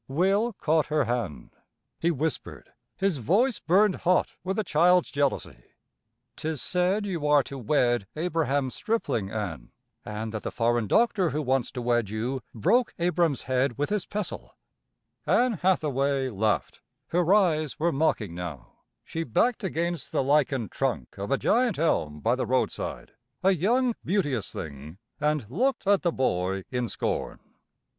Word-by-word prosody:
Will 195 - +1
caught 160 -4 +1
her 150 -1 +2
hand; 110 - -3 0.5
he 170 - +1
whispered; 160 -1 -3 0.3
his 190 -7 0
voice 220 - +2
burned 190 +3 +3
hot 180 +1 +2
with 190 +1 -2
a 215 - +1
child's 175 +1 +3
jealousy. 140 - -1 0.7
"'Tis 155 -2 -3
said 185 - 0
you 170 -7 -2
are 145 -1 +5
to 135 +1 -8
wed 120 -4 +1
Abraham 150 -5 0
Stripling, 140 - -1
Ann, 90 - -5 0.3
an' 110 +1 -5
that 110 -1 -4
the - - -3
foreign 120 -1 +1
doctor 215 - +3
who 150 +1 -2
wants 130 -2 +1
to 125 -3 -4
wed 120 -3 +1
you, 120 +5 -2
broke 225 - +2
Abra'm's 170 -4 +1
head 130 -1 0
with 145 +5 -1
his 210 -4 -1
pestle." 210 -2 -5 0.7
Ann 245 -6 +2
Hathaway 140 -7 +1
laughed; 105 - -1 0.3
her 175 +1 +2
eyes 160 -8 +3
were 170 +2 +2
mocking 135 - 0
now; 85 -8 -7 0.3
she 165 - -4
backed 215 - +1
against 170 -4 -2
the - - +1
lichened 135 -4 +1
trunk 135 -4 -2
of 100 - -4
a 140 - +2
giant 240 - +2
elm 75 - 0
by - - +2
the - - -1
roadside, - - -1 0.3
a 190 - +5
young, 235 - +2
beauteous 145 - -1
thing, 75 +2 -8 0.2
and 150 -4 0
looked 250 - 0
at 200 0 +4
the 175 - +1
boy 95 - 0
in 125 -2 -1
scorn. - - -2
150 Hz, 150 wpm, -27 LUFS, 120-180 Hz, 0.7 s, are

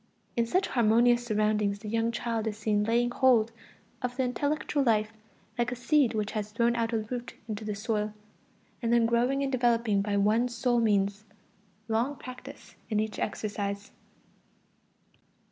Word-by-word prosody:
In 235 -1 +1
such 370 +10 +1
harmonious 240 +1 +4
surroundings 210 -2 +1
the 210 - -10
young 225 +2 0
child 230 -1 -2
is 215 -1 -3
seen 210 -1 +1
laying 240 +2 +2
hold 240 -3 +4 0.5
of 250 +1 -3
the 260 - +2
intellectual 285 +3 -1
life 220 -4 +2 0.5
like 240 +1 +1
a - - -2
seed 250 0 +2
which 210 -1 -1
has 215 -1 -4
thrown 235 +2 +2
out 230 -1 0
a 230 - +1
root 245 -1 -5
into 215 -1 -5
the 210 -1 -3
soil, 210 0 -1 0.7
and 230 -1 0
then 235 -1 +4
growing 245 +4 +2
and 270 - -1
developing 235 -5 +2
by 200 0 -1
one 215 +4 +3
sole 240 0 +1
means: 205 -1 +1 0.6
long 235 +6 0
practice 250 -2 -11 0.2
in 215 -2 +1
each 215 0 -2
exercise. 205 -1 -3
230 Hz, 160 wpm, -29 LUFS, 215-240 Hz, 0.7 s, harmonious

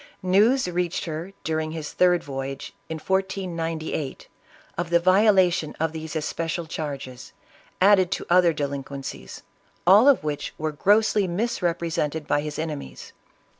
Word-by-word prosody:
News 210 +8 +3
reached 175 -1 -2
her 165 +3 -5
during 155 0 -2
his 155 -2 -6
third 180 -2 +3
voyage, 135 -1 -6 0.2
in 160 - -3
1498, 165 -5 -3 0.5
of 175 0 -3
the 170 0 +4
violation 185 -3 +3
of 160 0 0
these 160 0 -7
especial 165 +2 -2
charges, 140 -5 -6 0.5
added 190 -1 +5
to - - -3
other 175 -1 +5
delinquencies, 140 -2 -6 0.4
all 200 +8 +7
of 280 - +5
which 150 -1 -4
were 155 0 -2
grossly 205 +5 +3
misrep 180 -3 -1
resented 160 -2 -2
by 145 0 +1
his 150 0 -5
enemies. 150 - -6
165 Hz, 130 wpm, -24 LUFS, 150-185 Hz, 0.5 s, all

